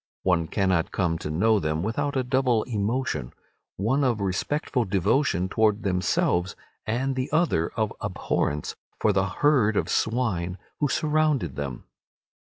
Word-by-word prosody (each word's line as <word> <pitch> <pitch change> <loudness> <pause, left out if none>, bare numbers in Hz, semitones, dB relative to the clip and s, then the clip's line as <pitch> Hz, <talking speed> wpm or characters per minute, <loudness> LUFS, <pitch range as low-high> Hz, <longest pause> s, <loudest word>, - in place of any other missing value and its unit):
One 85 -3 +2
cannot 95 -3 +1
come 85 -4 0
to 75 - -5
know 105 +8 +3
them 80 -1 -1
without 140 +7 -1
a 130 - +1
double 125 -3 +2
emotion, 110 - -2 0.4
one 130 +9 +1
of 120 -5 +1
respectful 125 - -1
devotion 95 - +1
towards 110 +1 +1
themselves, 90 -1 +1 0.3
and 130 +5 0
the 130 0 -3
other 155 - +2
of - - -1
abhorrence 75 +1 -2 0.2
for 105 - +3
the 95 0 +2
herd 110 -1 +2
of - - 0
swine 100 -7 0 0.2
who 145 - +2
surrounded 150 - +1
them. 70 -3 -5
105 Hz, 140 wpm, -25 LUFS, 90-130 Hz, 0.4 s, know